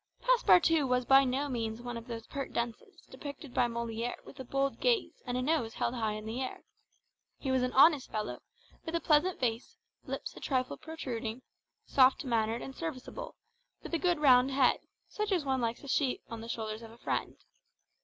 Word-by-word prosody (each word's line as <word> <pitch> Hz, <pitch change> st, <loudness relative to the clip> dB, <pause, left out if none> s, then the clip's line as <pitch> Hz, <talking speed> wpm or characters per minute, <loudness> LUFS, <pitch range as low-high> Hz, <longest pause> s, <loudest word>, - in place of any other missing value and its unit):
Passepartout 340 Hz, -, +4 dB
was 250 Hz, 0 st, +2 dB
by 270 Hz, +1 st, +7 dB
no 270 Hz, +2 st, 0 dB
means 225 Hz, -4 st, -3 dB
one 245 Hz, 0 st, -6 dB
of 230 Hz, +1 st, -7 dB
those 230 Hz, -2 st, -6 dB
pert 275 Hz, -2 st, -5 dB
dunces 235 Hz, -, -4 dB
depicted 285 Hz, -2 st, -8 dB
by 245 Hz, -, +3 dB
Molière 235 Hz, 0 st, -3 dB
with 275 Hz, -, -13 dB
a -, -, -4 dB
bold 275 Hz, +2 st, -1 dB
gaze 480 Hz, -3 st, +1 dB
and 245 Hz, 0 st, -1 dB
a 255 Hz, -, -1 dB
nose 265 Hz, -6 st, 0 dB
held 235 Hz, -, -1 dB
high 220 Hz, -3 st, -1 dB
in 215 Hz, 0 st, -6 dB
the 230 Hz, +4 st, -3 dB
air; 260 Hz, -, -5 dB, 0.7 s
he 265 Hz, -, -2 dB
was 260 Hz, -1 st, +3 dB
an 250 Hz, 0 st, 0 dB
honest 285 Hz, 0 st, +6 dB
fellow, 210 Hz, -1 st, -3 dB, 0.4 s
with 325 Hz, -, -4 dB
a -, -, +2 dB
pleasant 330 Hz, +4 st, +3 dB
face, 235 Hz, -1 st, -2 dB, 0.3 s
lips -, -, -5 dB
a -, -, -9 dB
trifle 255 Hz, -2 st, -1 dB
protruding, 250 Hz, -7 st, -5 dB, 0.4 s
soft 265 Hz, +2 st, +4 dB
mannered 230 Hz, -1 st, 0 dB
and 270 Hz, -, -8 dB
serviceable, 330 Hz, -, -6 dB, 0.5 s
with -, -, -8 dB
a 335 Hz, -, +2 dB
good 350 Hz, -1 st, +2 dB
round 260 Hz, -3 st, +6 dB
head, 270 Hz, -1 st, +3 dB, 0.3 s
such 425 Hz, 0 st, -3 dB
as 350 Hz, -6 st, +1 dB
one 265 Hz, -1 st, +1 dB
likes 230 Hz, 0 st, -1 dB
to 280 Hz, -, -11 dB
see 270 Hz, -1 st, +1 dB
on 230 Hz, -1 st, -5 dB
the 230 Hz, -, -8 dB
shoulders 220 Hz, -1 st, -4 dB
of 225 Hz, -, -10 dB
a 230 Hz, -, -15 dB
friend. 135 Hz, -, -2 dB
255 Hz, 195 wpm, -31 LUFS, 230-290 Hz, 0.7 s, by